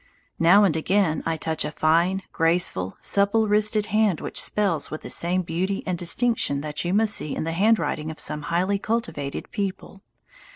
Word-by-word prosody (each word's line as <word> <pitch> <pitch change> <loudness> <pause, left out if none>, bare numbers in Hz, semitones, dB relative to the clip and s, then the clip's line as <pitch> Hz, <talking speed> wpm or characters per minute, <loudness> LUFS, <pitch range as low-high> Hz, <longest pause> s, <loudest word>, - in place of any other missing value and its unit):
Now 180 +5 +6
and 180 -6 +2
again 170 0 +1
I 165 -1 -1
touch 160 0 -1
a 150 - -3
fine, 170 +5 +1
graceful, 165 - 0
supple 205 +2 +2
wristed 210 0 +2
hand 215 -6 +2
which - - 0
spells 185 -9 0
with 155 - -7
the - - -5
same 180 +2 +1
beauty 185 +4 -2
and 185 - -1
distinction 175 - 0
that 150 0 -3
you 175 - -2
must 215 +2 +2
see 150 - -2
in - - -3
the 165 - -2
handwriting 165 -6 +1
of 160 - -8
some 150 - -2
highly 185 +4 0
cultivated 215 - -4
people. 195 -1 -5
180 Hz, 175 wpm, -24 LUFS, 160-205 Hz, -, Now